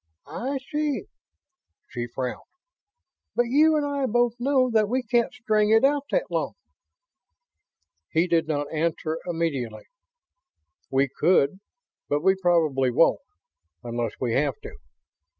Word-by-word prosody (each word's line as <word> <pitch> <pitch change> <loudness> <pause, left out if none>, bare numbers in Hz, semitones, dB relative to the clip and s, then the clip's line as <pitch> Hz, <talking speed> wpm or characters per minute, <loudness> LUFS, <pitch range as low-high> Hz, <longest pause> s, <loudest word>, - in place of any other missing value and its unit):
"I 270 +3 -4
see." 300 -1 -1 0.8
She 120 -1 -5
frowned. 125 +1 -5 0.9
"But 240 - +3
you 310 +4 +5
and 295 -1 +1
I 280 -2 -1
both 240 0 +2
know 260 -1 +2
that 215 -2 +2
we 255 +2 0
can't 240 -2 +1
string 215 -1 +1
it 225 +2 +5
out 285 0 +1
that - - -1
long." - - -1 1.6
He 165 +1 +2
did 170 -3 +1
not 145 -1 -2
answer 160 0 -1
immediately. 150 -10 -2 1.1
"We 135 +1 +2
could. 160 +3 +2 0.5
But 145 +1 0
we 190 +1 +5
probably 165 -8 +2
won't... 135 - +3 0.6
unless 120 -2 -3
we 120 -3 -1
have 140 0 0
to. - - -9
175 Hz, 130 wpm, -25 LUFS, -, 1.6 s, you